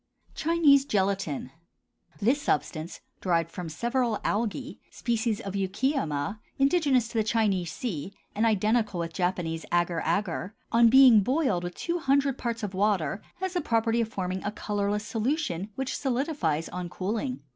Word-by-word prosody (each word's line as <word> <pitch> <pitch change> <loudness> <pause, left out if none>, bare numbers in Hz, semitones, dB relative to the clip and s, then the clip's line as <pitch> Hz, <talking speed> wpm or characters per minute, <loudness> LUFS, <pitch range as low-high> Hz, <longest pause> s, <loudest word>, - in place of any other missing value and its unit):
CHINESE 310 -4 +4
GELATIN. 195 - -1 0.7
This 250 +8 +2
substance, 155 - -2 0.2
derived 165 -3 +1
from 175 -2 -6
several 235 - 0
algæ, 235 +6 -2
species 230 -2 -1
of 195 - -6
Eucheuma, 200 - -1 0.2
indigenous 275 -4 +3
to 230 - -1
the - - +3
Chinese 205 -6 +1
sea, 190 - -4 0.2
and 215 - 0
identical 215 -2 +2
with 165 -1 -3
Japanese 175 -3 -1
agar 175 -1 +1
agar, 180 +3 -1 0.2
on 230 0 +6
being 260 -3 +8
boiled 250 - +1
with 175 0 -5
two 345 0 -2
hundred 275 -2 +2
parts 230 -1 -3
of 200 -2 -3
water 195 -3 +1
has 375 0 -3
the 355 - 0
property 230 -2 +1
of 225 - 0
forming 185 -3 -3
a 205 - -2
colorless 210 0 -2
solution 225 - -1
which 265 0 -2
solidifies 255 - -1
on 180 -1 -5
cooling. 220 +9 -3
215 Hz, 145 wpm, -27 LUFS, 180-255 Hz, 0.7 s, being